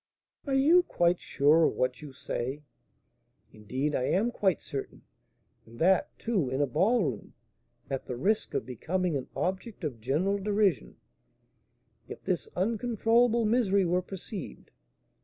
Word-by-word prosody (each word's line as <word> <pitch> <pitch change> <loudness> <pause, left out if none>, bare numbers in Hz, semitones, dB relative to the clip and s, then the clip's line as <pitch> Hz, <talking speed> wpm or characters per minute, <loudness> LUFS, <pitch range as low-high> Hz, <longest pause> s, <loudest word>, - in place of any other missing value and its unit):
"Are 270 - +1
you 310 +7 +6
quite 175 - +1
sure 155 +4 +3
of - - 0
what 125 0 -1
you 150 -2 -9
say?" 130 +2 -4 0.9
"Indeed, 130 +8 -3
I 130 - 0
am 215 - +1
quite 195 -6 +1
certain; 135 -1 -7 0.6
and 115 +1 -15
that, 185 +5 +2
too, 200 - -1
in 130 +1 -2
a 145 - +3
ballroom, 160 - 0 0.5
at 135 -1 -4
the 125 - -3
risk 205 - 0
of - - -1
becoming 170 +8 -2
an 135 - -3
object 190 +3 -3
of 130 -8 -4
general 170 - 0
derision, 205 -1 0 1.1
if - - -9
this - - -2
uncontrollable 230 +2 +2
misery 210 -4 +2
were 180 +1 +1
perceived! 195 +1 -8
180 Hz, 140 wpm, -29 LUFS, 140-215 Hz, 1.1 s, you